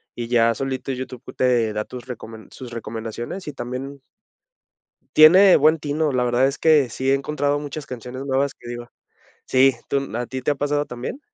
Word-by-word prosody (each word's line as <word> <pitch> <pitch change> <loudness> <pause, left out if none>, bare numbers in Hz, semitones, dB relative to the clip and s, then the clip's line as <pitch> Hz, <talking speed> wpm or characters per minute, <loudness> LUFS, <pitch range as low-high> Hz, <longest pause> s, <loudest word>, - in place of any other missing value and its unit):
y 120 -1 -4
ya 115 -1 +3
solito 135 0 -3
YouTube 130 -1 -7
te 120 -4 +2
da 105 0 -2
tus 125 -2 -9
recomen 110 -3 -9
sus 125 -2 -10
recomendaciones 115 - -6
y 150 - -7
también 130 +3 -6 1.1
tiene 180 +5 +8
buen 155 +2 +4
tino, 150 +1 -1
la 125 -2 +1
verdad 120 +2 +2
es 135 +1 -1
que 150 -5 +4
sí 130 +4 -2
he - - +5
encontrado 145 +1 0
muchas 145 +1 -6
canciones 125 +2 -7
nuevas 135 0 0
que 120 - -15
digo 120 0 -7 0.6
sí, 135 +1 +4
tú 140 - 0
no 135 -4 -6
¿a 120 - -2
ti 130 0 -5
te 135 - +1
ha - - -1
pasado 145 +1 -1
también? 125 - -6
130 Hz, 190 wpm, -22 LUFS, 120-145 Hz, 1.1 s, tiene